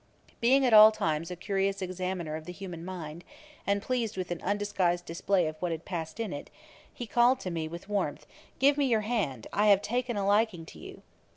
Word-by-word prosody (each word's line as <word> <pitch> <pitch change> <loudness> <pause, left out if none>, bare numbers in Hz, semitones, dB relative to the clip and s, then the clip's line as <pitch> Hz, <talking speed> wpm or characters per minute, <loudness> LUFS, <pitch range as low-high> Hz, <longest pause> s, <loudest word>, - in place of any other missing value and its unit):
Being 265 +3 +4
at 245 - +3
all 215 0 +10
times 160 -5 -2
a 180 - -5
curious 195 +1 -1
examiner 185 -3 -3
of 155 0 -7
the 180 - -6
human 180 -2 -8
mind, 170 -3 -7 0.4
and 200 0 +1
pleased 235 -5 -2
with 185 -1 -4
an 175 - -3
undisguised 185 -3 0
display 175 +2 0
of 155 0 -4
what 175 -1 -1
had 165 0 -5
passed 165 0 -5
in 220 -7 -3
it, 145 - -7 0.4
he 240 - -7
called 240 +3 +3
to 185 - -4
me 165 -2 -3
with 170 +4 -9
warmth, 180 -8 -2 0.3
'Give 280 +2 +4
me 285 - +3
your 225 -3 +2
hand; 205 - -2
I 210 +1 +3
have 200 -1 +5
taken 240 +1 -1
a 200 - -1
liking 205 -4 +2
to 80 - -13
you.' - - -11
190 Hz, 210 wpm, -29 LUFS, 170-215 Hz, 0.4 s, all